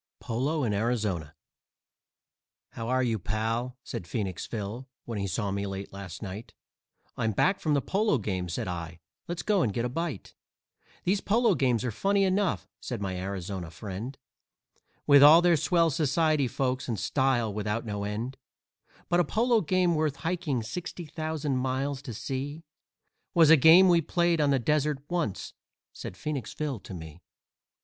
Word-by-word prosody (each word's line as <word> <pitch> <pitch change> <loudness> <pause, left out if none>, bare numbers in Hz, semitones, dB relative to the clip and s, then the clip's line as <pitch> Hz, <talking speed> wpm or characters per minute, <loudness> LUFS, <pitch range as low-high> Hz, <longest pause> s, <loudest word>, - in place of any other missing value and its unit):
POLO 140 +6 -1
IN 110 -4 0
ARIZONA 100 -8 -1 1.4
"How 115 - -6
are 130 0 +2
you, 115 -3 0
pal?" 115 +6 -2
said 85 - -6
Phoenix 95 -2 -3
Phil, 115 +4 -5 0.2
when 115 -3 -4
he 100 - -1
saw 100 +2 -2
me 100 +1 -2
late 95 0 -6
last 100 -1 -8
night; 100 +3 -8 0.6
"I'm 110 -1 0
back 190 - +2
from 150 -2 +1
the 140 - +1
polo 205 -5 +1
game," 95 -5 -3
said 85 - -3
I, 85 -2 -5 0.3
"let's 170 -1 -4
go 205 -3 +2
and 115 - +1
get 115 +4 -1
a - - -1
bite." 155 - -4 0.7
"These 195 +2 +1
polo 230 +1 +3
games 125 -6 +1
are 125 - -1
funny 195 - +1
enough," 190 -1 +1
said 120 -4 -5
my 95 -2 -3
Arizona 95 -1 -4
friend, 105 - -6 0.9
"With 140 -1 +7
all 150 +3 +10
their 175 -1 +4
swell 165 +1 +2
society 155 0 +2
folks 130 +1 -1
and 115 -5 -2
style 130 -5 +1
without 105 +2 -2
no 105 -2 -3
end; 115 +6 -4 0.7
But 175 - +2
a - - +5
polo 230 +4 +2
game 180 0 +2
worth 155 -3 0
hiking 160 -7 -2
sixty 175 +8 -6
thousand 155 -3 -2
miles 130 +2 -1
to 130 -4 -7
see 140 +7 -4 0.7
Was 165 -2 +7
a - - +11
game 165 +6 +8
we 170 -2 +5
played 170 0 +1
on 145 - +3
the 140 - +4
desert 150 +3 +1
once," 170 - -2 0.4
said 90 - -8
Phoenix 150 -7 -4
Phil 145 -6 -3
to 95 - -9
me. 80 0 -10
130 Hz, 165 wpm, -28 LUFS, 105-160 Hz, 1.4 s, a